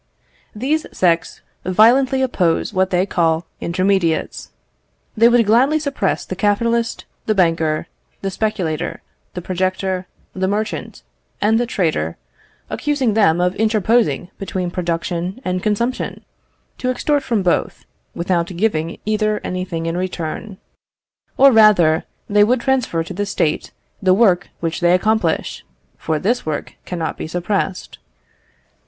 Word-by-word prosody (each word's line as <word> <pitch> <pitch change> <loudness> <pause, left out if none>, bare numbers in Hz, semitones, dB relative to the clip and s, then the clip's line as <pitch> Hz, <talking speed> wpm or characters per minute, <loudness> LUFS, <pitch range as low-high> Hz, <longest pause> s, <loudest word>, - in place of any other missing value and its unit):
These 285 +8 -1
sects 170 -2 0 0.2
violently 250 +8 +4
oppose 180 -8 0
what 190 0 +2
they 180 0 +2
call 165 -3 +1
intermediates. 185 -2 0 0.7
They 230 +1 +6
would 240 -1 +4
gladly 255 +8 +4
suppress 280 -10 -1
the 185 - -5
capitalist, 230 +4 0 0.2
the 215 - +2
banker, 165 -4 +1 0.4
the 195 - -2
speculator, 185 -7 -2 0.3
the 180 - -5
projector, 185 0 -2 0.3
the 190 0 -1
merchant, 210 - -3 0.4
and 220 +2 +3
the 240 - 0
trader, 155 - -1 0.5
accusing 285 -6 0
them 200 -6 +3
of 180 0 +2
interposing 215 - +1
between 185 -2 -3
production 175 +3 -3
and 185 0 -1
consumption, 230 +5 -2 0.5
to 255 - -1
extort 290 +3 +1
from 230 -7 -1
both, 175 - 0 0.3
without 170 -1 0
giving 170 -3 -1
either 215 0 0
anything 185 -2 -3
in 165 0 -2
return. 185 +2 -4 0.8
Or 275 0 +7
rather, 200 -8 +5 0.2
they 205 0 +4
would 240 +3 +2
transfer 255 -11 0
to 180 - -8
the 205 +2 -2
State 155 -5 -1 0.3
the 185 -2 +4
work 190 -5 +3
which 165 -1 -2
they 175 0 +4
accomplish, 220 +4 0 0.3
for 160 -1 -2
this 230 +10 0
work 155 -1 -4
cannot 170 -3 -3
be - - -4
suppressed. 185 +2 -3
190 Hz, 130 wpm, -19 LUFS, 175-220 Hz, 0.8 s, Or